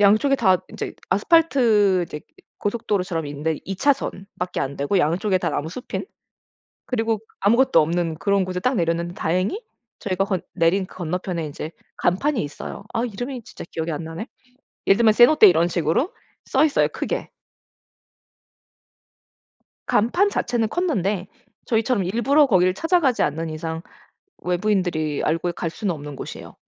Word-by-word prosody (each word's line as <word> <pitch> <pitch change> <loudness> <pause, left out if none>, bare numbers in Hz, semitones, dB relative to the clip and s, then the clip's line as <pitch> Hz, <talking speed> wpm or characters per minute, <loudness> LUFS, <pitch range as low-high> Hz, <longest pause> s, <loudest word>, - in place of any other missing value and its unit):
양쪽에 215 +7 +5
다 185 -5 +4
인제 - - -6 0.2
아스팔트 215 - +4
이제 150 - -7 0.4
고속도로처럼 195 -7 -1
있는데 145 +2 -2
2 195 - -4
차선 270 -6 0
밖에 180 0 -3
안되고 140 +6 -1
양쪽에 185 +6 +1
다 175 -2 -1
나무숲인 160 - -4 0.8
그리고 225 -3 0 0.2
아무것도 235 +6 +4
없는 165 +1 0
그런 200 +4 +1
곳에 180 0 -3
딱 255 +7 +1
내렸는데 170 -2 0
다행히 185 - -1 0.4
저희가 195 -1 -1
건 190 -3 -1
내린 185 +2 +2
건너편에 180 -1 -4
인제 150 +1 -6 0.3
간판이 225 - +1
있어요. 145 +6 -7
아 230 - 0
이름이 245 +2 -5
진짜 - - -10
기억이 160 0 -3
안 150 +1 -4
나네. 165 +8 -6 0.6
예를 195 - +5
들면 225 -2 +5
세노테 240 -1 +7
이런 170 0 +3
식으로 170 - 0 0.3
써 - - +3
있어요 305 - +3
크게. - - -4 2.6
간판 345 - +2
자체는 240 - 0
컸는데 210 - -1 0.4
저희처럼 225 -2 +1
일부러 245 +10 +3
거기를 185 -7 +3
찾아가지 325 - +2
않는 160 +2 -1
이상 160 +1 -4 0.6
외부인들이 175 -5 0
알고 165 +3 0
갈 170 -1 -3
수는 190 +1 -2
없는 145 -2 -8
곳이에요. - - -8
190 Hz, 330 characters per minute, -23 LUFS, 165-230 Hz, 2.6 s, 세노테